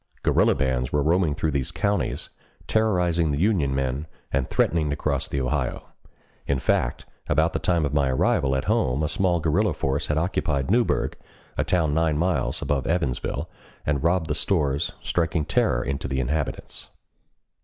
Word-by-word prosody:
Guerrilla -, -, +3 dB
bands 65 Hz, -2 st, 0 dB
were 75 Hz, -1 st, +1 dB
roaming 80 Hz, -1 st, +2 dB
through 80 Hz, 0 st, -1 dB
these 70 Hz, -2 st, -1 dB
counties, 100 Hz, 0 st, -1 dB, 0.4 s
terrorizing 90 Hz, -7 st, +2 dB
the 70 Hz, 0 st, -1 dB
Union 85 Hz, -9 st, +2 dB
men, 70 Hz, +3 st, -2 dB, 0.3 s
and 70 Hz, -2 st, 0 dB
threatening 80 Hz, -3 st, +1 dB
to 70 Hz, -, 0 dB
cross 70 Hz, -2 st, -1 dB
the 70 Hz, -, -2 dB
Ohio. 65 Hz, -2 st, -2 dB, 0.6 s
In 70 Hz, -, +1 dB
fact, -, -, 0 dB, 0.2 s
about 80 Hz, +3 st, +2 dB
the -, -, 0 dB
time 85 Hz, -4 st, +1 dB
of 70 Hz, -, -2 dB
my 70 Hz, -2 st, +2 dB
arrival 65 Hz, +1 st, +2 dB
at 65 Hz, -, 0 dB
home 65 Hz, +4 st, +1 dB
a -, -, +1 dB
small 90 Hz, +1 st, +1 dB
guerrilla 85 Hz, +5 st, +1 dB
force 70 Hz, 0 st, -1 dB
had 75 Hz, -, 0 dB
occupied 80 Hz, -4 st, 0 dB
Newburg, 120 Hz, +1 st, +1 dB, 0.4 s
a -, -, +1 dB
town 80 Hz, -5 st, +1 dB
nine 80 Hz, -1 st, +2 dB
miles 85 Hz, -5 st, 0 dB
above 70 Hz, -3 st, -1 dB
Evansville, 80 Hz, -7 st, -1 dB, 0.4 s
and 70 Hz, -2 st, 0 dB
robbed 85 Hz, 0 st, +2 dB
the 75 Hz, -, 0 dB
stores, 75 Hz, -3 st, 0 dB
striking 80 Hz, -2 st, 0 dB
terror -, -, +1 dB
into 70 Hz, 0 st, -3 dB
the 65 Hz, 0 st, -1 dB
inhabitants. 70 Hz, +3 st, -3 dB
75 Hz, 165 wpm, -24 LUFS, 70-85 Hz, 0.6 s, Guerrilla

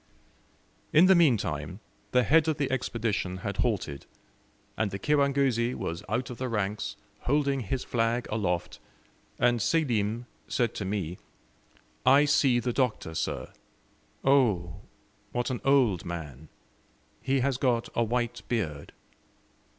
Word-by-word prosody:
In 155 Hz, +4 st, +7 dB
the 190 Hz, -, +7 dB
meantime, 95 Hz, -, +1 dB, 0.3 s
the 125 Hz, 0 st, +3 dB
head 160 Hz, +3 st, +4 dB
of 155 Hz, -2 st, +1 dB
the 140 Hz, -2 st, -1 dB
Expedition 115 Hz, -7 st, -1 dB
had 100 Hz, -1 st, -3 dB
halted, 90 Hz, -, -1 dB, 0.7 s
and 110 Hz, -2 st, 0 dB
the 100 Hz, -, -4 dB
kirangozi 135 Hz, -2 st, +2 dB
was 85 Hz, +1 st, -4 dB
out 125 Hz, +5 st, -1 dB
of 120 Hz, -, -8 dB
the 130 Hz, -1 st, -2 dB
ranks, 105 Hz, -2 st, -2 dB, 0.3 s
holding 140 Hz, 0 st, +2 dB
his 125 Hz, +3 st, -3 dB
flag 115 Hz, +1 st, 0 dB
aloft, 90 Hz, -5 st, -2 dB, 0.6 s
and 120 Hz, -1 st, +2 dB
Selim 120 Hz, -6 st, 0 dB, 0.2 s
said 120 Hz, -2 st, 0 dB
to 100 Hz, -, -4 dB
me, 95 Hz, -3 st, -3 dB, 0.8 s
"I 140 Hz, +3 st, +6 dB
see 140 Hz, -3 st, +3 dB
the 120 Hz, 0 st, -2 dB
Doctor, 120 Hz, -11 st, -1 dB
sir. -, -, -3 dB, 0.7 s
Oh, 100 Hz, -, +2 dB, 0.5 s
what 120 Hz, +1 st, -1 dB
an 125 Hz, -, -3 dB
old 125 Hz, -11 st, +3 dB
man! 80 Hz, -4 st, -7 dB, 0.7 s
He 135 Hz, 0 st, +1 dB
has 135 Hz, -1 st, +1 dB
got 120 Hz, -3 st, +1 dB
a 120 Hz, -, +2 dB
white 120 Hz, +1 st, -1 dB
beard." 80 Hz, -12 st, -3 dB
120 Hz, 130 wpm, -28 LUFS, 100-135 Hz, 0.8 s, In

